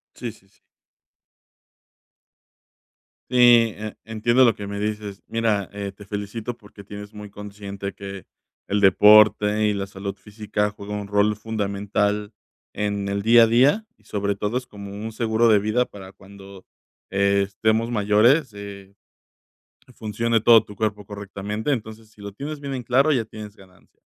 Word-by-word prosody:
Sí, 120 Hz, -, -5 dB
sí, 95 Hz, -3 st, -23 dB
sí. -, -, -34 dB, 2.7 s
Sí, 120 Hz, -3 st, +6 dB
e 110 Hz, 0 st, -6 dB
entiendo 115 Hz, +3 st, +2 dB
lo 115 Hz, -3 st, +4 dB
que 100 Hz, 0 st, -7 dB
me 100 Hz, 0 st, -5 dB
dices, 105 Hz, -1 st, -4 dB
mira, 110 Hz, -4 st, 0 dB
eh, 100 Hz, -1 st, -5 dB
te 100 Hz, +1 st, -14 dB
felicito 105 Hz, +4 st, -5 dB
porque 100 Hz, -1 st, -15 dB
tienes 105 Hz, +1 st, -10 dB
muy 105 Hz, -1 st, -9 dB
consciente 100 Hz, -1 st, -7 dB
que 100 Hz, -2 st, -9 dB, 0.4 s
el 100 Hz, +1 st, +1 dB
deporte 105 Hz, +1 st, +6 dB
y 105 Hz, -, +2 dB
la 100 Hz, -1 st, -3 dB
salud 100 Hz, 0 st, -6 dB
física 105 Hz, +1 st, -3 dB
juega 105 Hz, 0 st, -9 dB
un 105 Hz, -1 st, -4 dB
rol 105 Hz, +1 st, +2 dB
fundamental 105 Hz, 0 st, -2 dB, 0.4 s
en 100 Hz, -1 st, -2 dB
el 100 Hz, 0 st, -2 dB
día 115 Hz, +1 st, +7 dB
a -, -, +3 dB
día, 135 Hz, -, +3 dB
y -, -, -31 dB
sobre 100 Hz, -1 st, -2 dB
todo 105 Hz, +5 st, -1 dB
es 125 Hz, -, -10 dB
como 100 Hz, -3 st, -10 dB
un 105 Hz, +2 st, -6 dB
seguro 115 Hz, +1 st, +1 dB
de 105 Hz, -2 st, +6 dB
vida 110 Hz, +5 st, +1 dB
para 95 Hz, -1 st, -12 dB
cuando 100 Hz, 0 st, -14 dB, 0.4 s
estemos 100 Hz, +3 st, +1 dB
mayores, 110 Hz, +6 st, +3 dB
eh, 100 Hz, -1 st, -10 dB, 1.0 s
funcione 115 Hz, +1 st, -1 dB
todo 115 Hz, -1 st, +7 dB
tu 105 Hz, -, -12 dB
cuerpo 105 Hz, 0 st, -2 dB
correctamente, 100 Hz, +4 st, -5 dB
entonces, 110 Hz, -2 st, -7 dB
si 105 Hz, -, -19 dB
lo 100 Hz, -, -7 dB
tienes 145 Hz, +8 st, -6 dB
bien 140 Hz, -1 st, -5 dB
en 130 Hz, -, -3 dB
claro, 135 Hz, +6 st, +3 dB
ya 120 Hz, -5 st, +1 dB
tienes 105 Hz, -1 st, -10 dB
ganancia, 95 Hz, -1 st, -21 dB
105 Hz, 155 wpm, -23 LUFS, 100-110 Hz, 2.7 s, día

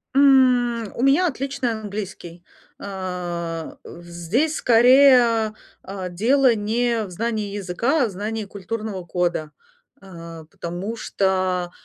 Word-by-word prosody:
М, 250 Hz, -5 st, +4 dB
у -, -, -4 dB
меня 275 Hz, +7 st, +4 dB
отличный 275 Hz, -3 st, -2 dB
английский, 200 Hz, -5 st, -7 dB, 0.4 s
э, -, -, -12 dB, 1.0 s
в 175 Hz, -, -12 dB
здесь 185 Hz, -, -1 dB
скорее, 240 Hz, -2 st, +5 dB, 0.3 s
э, 190 Hz, -1 st, -6 dB
дело 245 Hz, +7 st, +3 dB
не 225 Hz, +2 st, 0 dB
в -, -, -10 dB
знании 210 Hz, +1 st, -3 dB
языка, 230 Hz, -, 0 dB
а -, -, +3 dB
в -, -, -6 dB
знании 215 Hz, +3 st, -4 dB
культурного 200 Hz, -1 st, -6 dB
кода, 175 Hz, -3 st, -2 dB, 0.5 s
э, 170 Hz, -4 st, -11 dB
потому 175 Hz, +6 st, -5 dB
что, 185 Hz, -3 st, -1 dB
215 Hz, 115 wpm, -22 LUFS, 185-245 Hz, 1.0 s, скорее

